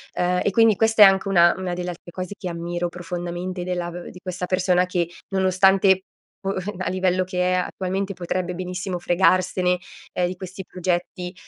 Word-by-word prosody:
uhm, 180 Hz, 0 st, +1 dB
e 200 Hz, -, +1 dB
quindi 225 Hz, +1 st, +5 dB
questa 220 Hz, 0 st, +5 dB
è -, -, +12 dB
anche 195 Hz, 0 st, +4 dB
una 175 Hz, -2 st, +6 dB
una 185 Hz, -1 st, -3 dB
delle 180 Hz, 0 st, -3 dB
altre 175 Hz, 0 st, -12 dB
cose 185 Hz, +2 st, -5 dB
che 185 Hz, -, -5 dB
ammiro 175 Hz, +1 st, -3 dB
profondamente 175 Hz, +1 st, -5 dB
della 175 Hz, -1 st, -2 dB
v 175 Hz, 0 st, -8 dB
di 180 Hz, -, -12 dB
questa 180 Hz, -1 st, -4 dB
persona 185 Hz, -1 st, +2 dB
che 175 Hz, -2 st, -1 dB, 0.2 s
nonostante, 190 Hz, 0 st, +4 dB, 0.4 s
boh, 195 Hz, 0 st, -2 dB, 0.2 s
a 185 Hz, -, -2 dB
livello 185 Hz, 0 st, +1 dB
che 180 Hz, 0 st, 0 dB
è -, -, +3 dB
attualmente 190 Hz, +2 st, -2 dB
potrebbe 180 Hz, 0 st, -3 dB
benissimo 180 Hz, +1 st, -4 dB
fregarsene, 180 Hz, 0 st, +2 dB, 0.4 s
ehm, 180 Hz, -1 st, +1 dB
di 180 Hz, -, -5 dB
questi 185 Hz, +1 st, -8 dB
progetti, 180 Hz, 0 st, -3 dB
180 Hz, 180 wpm, -23 LUFS, 175-190 Hz, 0.4 s, è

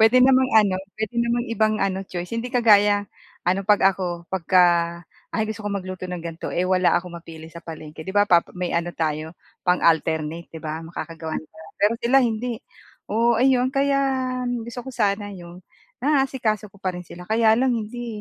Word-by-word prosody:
Puwede 225 Hz, +3 st, +6 dB
namang 260 Hz, 0 st, +5 dB
ano, 205 Hz, -4 st, +4 dB, 0.2 s
puwede 220 Hz, -1 st, -2 dB
namang 235 Hz, 0 st, 0 dB
ibang 215 Hz, -1 st, +2 dB
ano, 190 Hz, -1 st, 0 dB
choice. 175 Hz, +3 st, -5 dB
Hindi 230 Hz, +2 st, -3 dB
kagaya, 205 Hz, -4 st, +5 dB, 0.4 s
ano, 185 Hz, +2 st, +2 dB
'pag 210 Hz, -1 st, +5 dB
ako 175 Hz, -2 st, -4 dB
'pagka, 185 Hz, 0 st, +4 dB, 0.7 s
"Ay, 220 Hz, -1 st, 0 dB
gusto 215 Hz, -1 st, -7 dB
kong 200 Hz, -1 st, -1 dB
magluto 185 Hz, 0 st, -7 dB
ng 180 Hz, 0 st, -4 dB
ganito", 165 Hz, -1 st, -6 dB
eh 180 Hz, -, +1 dB
wala 185 Hz, -1 st, +3 dB
akong 175 Hz, 0 st, -9 dB
mapili 160 Hz, -1 st, -11 dB
sa 170 Hz, -, -10 dB
palengke, 155 Hz, -1 st, -9 dB
'di 190 Hz, -, -4 dB
ba 205 Hz, -, +6 dB, 0.3 s
may 180 Hz, -1 st, -2 dB
ano 170 Hz, +1 st, 0 dB
tayo, 155 Hz, 0 st, -2 dB, 0.3 s
pang-alternate, 165 Hz, -2 st, +1 dB
'di 160 Hz, -, -8 dB
ba? 155 Hz, 0 st, -4 dB
Makakagawa 165 Hz, -1 st, -6 dB
na -, -, -12 dB
tayo. 160 Hz, -, -14 dB
Pero 205 Hz, +3 st, +4 dB
sila, 250 Hz, +3 st, +5 dB
hindi! 230 Hz, 0 st, -2 dB, 0.5 s
Oo, 230 Hz, +2 st, +3 dB
ayun, 255 Hz, -1 st, +4 dB
kaya 275 Hz, 0 st, +2 dB, 0.7 s
gusto 235 Hz, +1 st, -6 dB
ko -, -, -5 dB
sana 205 Hz, -2 st, 0 dB
yung 175 Hz, -1 st, -11 dB, 0.4 s
naasikaso 265 Hz, -8 st, +1 dB
ko -, -, -18 dB
pa 185 Hz, -2 st, -1 dB
rin 180 Hz, -, -6 dB
sila. 180 Hz, +1 st, -10 dB
Kaya 220 Hz, 0 st, +4 dB
lang 260 Hz, 0 st, +2 dB
hindi 225 Hz, 0 st, -5 dB
200 Hz, 180 wpm, -23 LUFS, 175-230 Hz, 0.7 s, Puwede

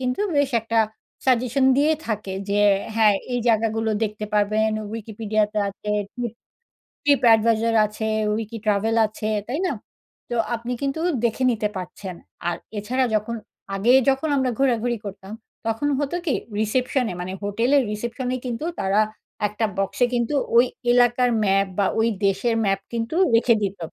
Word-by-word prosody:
কিন্তু 250 Hz, +7 st, -1 dB, 0.2 s
বেশ 285 Hz, -1 st, +2 dB
একটা 225 Hz, +1 st, -1 dB, 0.5 s
সাজেশন 255 Hz, +1 st, +2 dB
দিয়ে 295 Hz, +3 st, +4 dB
থাকে। 210 Hz, -3 st, -3 dB, 0.2 s
যে 205 Hz, +1 st, +2 dB, 0.4 s
হ্যাঁ, 215 Hz, -2 st, +5 dB, 0.2 s
এই 245 Hz, -, +1 dB
জায়গাগুলো 225 Hz, 0 st, +1 dB
দেখতে 210 Hz, 0 st, -2 dB
পারবেন 215 Hz, +1 st, +2 dB, 0.2 s
Wikipedia 215 Hz, -1 st, -1 dB
তে 215 Hz, -, -1 dB
আছে, 210 Hz, +1 st, -6 dB, 0.2 s
ট্রিপ 240 Hz, -3 st, -3 dB, 0.7 s
Trip 285 Hz, -1 st, +4 dB
Advisor 225 Hz, +1 st, +2 dB
আছে, 220 Hz, +1 st, -4 dB, 0.3 s
Wiki 225 Hz, +1 st, -5 dB
Travel 215 Hz, +2 st, +1 dB
আছে 215 Hz, 0 st, -5 dB, 0.2 s
তাই 275 Hz, +5 st, -2 dB
না? -, -, 0 dB, 0.6 s
তো -, -, -1 dB, 0.2 s
আপনি 235 Hz, +2 st, -4 dB
কিন্তু 275 Hz, +3 st, -1 dB, 0.2 s
দেখে 235 Hz, +3 st, 0 dB
নিতে 215 Hz, -3 st, 0 dB
পারছেন। 185 Hz, +1 st, -6 dB, 0.3 s
আর 170 Hz, -, -1 dB, 0.2 s
এছাড়া 255 Hz, +6 st, 0 dB
যখন 215 Hz, +2 st, 0 dB, 0.4 s
আগে 220 Hz, +6 st, +3 dB, 0.2 s
যখন 270 Hz, +4 st, +2 dB
আমরা 260 Hz, -2 st, +1 dB
ঘোরাঘুরি 240 Hz, -3 st, +1 dB
করতাম, 195 Hz, 0 st, -8 dB, 0.3 s
তখন 225 Hz, +6 st, 0 dB
হতো 290 Hz, +4 st, -1 dB
কি? 290 Hz, -, +2 dB, 0.3 s
রিসেপশনে 250 Hz, 0 st, 0 dB
মানে 185 Hz, +1 st, -4 dB
হোটেলের 235 Hz, +7 st, +2 dB
রিসেপশনে 240 Hz, +4 st, -3 dB
কিন্তু 240 Hz, +4 st, -3 dB, 0.2 s
তারা 195 Hz, +2 st, +2 dB, 0.5 s
একটা 215 Hz, +2 st, -1 dB
বক্সে 195 Hz, +5 st, +1 dB
কিন্তু 240 Hz, +4 st, 0 dB, 0.2 s
ওই 240 Hz, -, +7 dB, 0.3 s
এলাকার 245 Hz, 0 st, +4 dB
ম্যাপ 195 Hz, 0 st, +3 dB
বা 200 Hz, -, +3 dB
ওই 225 Hz, -, +3 dB, 0.2 s
দেশের 195 Hz, +4 st, +1 dB
ম্যাপ 195 Hz, -1 st, +1 dB
কিন্তু 230 Hz, +4 st, -3 dB, 0.2 s
রেখে 235 Hz, 0 st, +5 dB
দিত, 200 Hz, 0 st, -2 dB
225 Hz, 150 wpm, -23 LUFS, 210-250 Hz, 0.7 s, ওই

